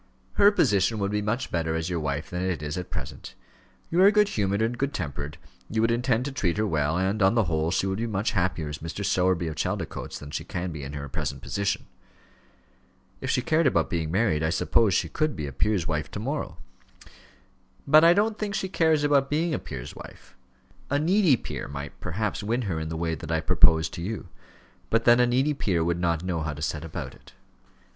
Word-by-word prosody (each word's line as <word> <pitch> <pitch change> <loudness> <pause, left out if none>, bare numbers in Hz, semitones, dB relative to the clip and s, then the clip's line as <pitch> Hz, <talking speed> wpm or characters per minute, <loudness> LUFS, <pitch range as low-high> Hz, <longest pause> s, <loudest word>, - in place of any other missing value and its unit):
"Her 205 0 +6
position 110 - +2
would 100 -1 -1
be 105 0 0
much 110 +5 -2
better 80 -1 -1
as 80 0 -2
your 90 -2 -1
wife 75 +3 -3
than 90 0 -2
it 90 -5 -2
is 75 0 -3
at 90 -1 -5
present. - - -7 0.6
You 170 +2 +3
are 195 - +8
good 210 -1 +4
humoured 100 - 0
and 115 +2 0
good 140 +3 -2
tempered, 75 -3 -4 0.3
you 110 - -1
would 115 +1 +3
intend 120 0 +1
to 140 - -3
treat 95 -10 -1
her 110 - +1
well, 80 -3 0
and, 95 +4 0
on 95 +4 +4
the 115 - +4
whole, 80 -3 0
she 95 - +1
would 95 +1 -1
be 115 - -1
much 105 0 -1
happier 95 -4 0
as 75 +1 -6
Mrs. 85 +5 -5
Sowerby, 90 -2 +2
of 80 - -4
Chaldicotes, - - -3
than 75 0 -10
she - - -3
can 90 0 -4
be 80 -2 -6
in 70 +1 -6
her 70 0 -5
present 75 -2 -4
position." 100 0 -1 1.3
"If - - -4
she 125 - +1
cared 160 -1 +3
about 85 -10 +1
being 80 -2 -1
married, 95 -4 +1
I 80 - +1
suppose 100 +3 +2
she - - +1
could 155 -1 -1
be 75 - -4
a 70 - -5
peer's 85 +5 0
wife 75 -2 -2
to - - -6
morrow." 125 - -3 1.3
"But 155 +3 +7
I 170 +1 +7
don't 215 +2 +1
think 205 -2 -2
she 190 -1 -2
cares 160 -4 +2
about 140 -2 +3
being 160 +3 0
a - - -1
peer's 65 -4 -8
wife. - - -13 0.5
A 140 - +2
needy 175 0 +4
peer - - -6
might 70 0 -7
perhaps 105 +5 -2
win 115 +4 -1
her 90 -7 -2
in 80 0 -4
the 80 - -4
way 85 0 -1
that 80 0 -6
I 80 - +2
propose 80 -1 +4
to 85 - -7
you; 95 -1 -5 0.6
but 115 0 +2
then 120 0 +6
a 125 - +5
needy 130 +5 +2
peer 90 - 0
would 85 +1 0
not 85 -1 0
know 90 -3 -2
how 75 -1 -2
to 75 - -9
set 80 -1 -2
about 80 - -6
it. - - -18
95 Hz, 225 wpm, -26 LUFS, 80-125 Hz, 1.3 s, are